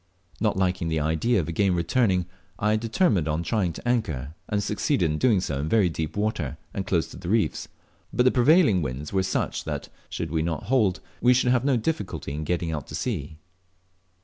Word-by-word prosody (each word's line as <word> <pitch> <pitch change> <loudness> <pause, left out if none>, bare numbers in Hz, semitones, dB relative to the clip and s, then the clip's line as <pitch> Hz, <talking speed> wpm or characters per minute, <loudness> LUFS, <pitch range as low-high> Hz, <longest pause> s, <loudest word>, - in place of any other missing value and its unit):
Not 105 -2 +1
liking 90 -2 0
the 80 -1 0
idea 80 +10 +1
of 80 - -2
again 95 +2 +1
returning, 90 +1 +2 0.3
I 105 +1 +2
determined 110 - +1
on 80 +2 -1
trying 95 -3 0
to 120 - -8
anchor, 80 - -1 0.2
and 105 -1 0
succeeded 105 - 0
in 75 - -2
doing 115 -7 +4
so, 70 -7 -2
in 75 +2 -2
very 105 -5 +4
deep 80 +2 -4
water 105 - -1 0.2
and 95 - -4
close 85 -3 +2
to - - -10
the 90 -1 -6
reefs; 110 +1 +1 0.4
but 125 - +2
the 130 - +5
prevailing 125 - +5
winds 70 +3 -4
were 95 - +3
such 95 0 -1
that, - - -4 0.2
should 80 -3 -4
we 80 -1 +1
not 80 0 -2
hold, 105 -5 +2 0.2
we 125 +1 +5
should 125 0 +3
have 125 -1 +2
no 135 -2 +3
difficulty 105 - -3
in 75 +1 -4
getting 85 0 -1
out 75 -4 -4
to - - -7
sea. 80 - -3
95 Hz, 200 wpm, -25 LUFS, 80-115 Hz, 0.4 s, the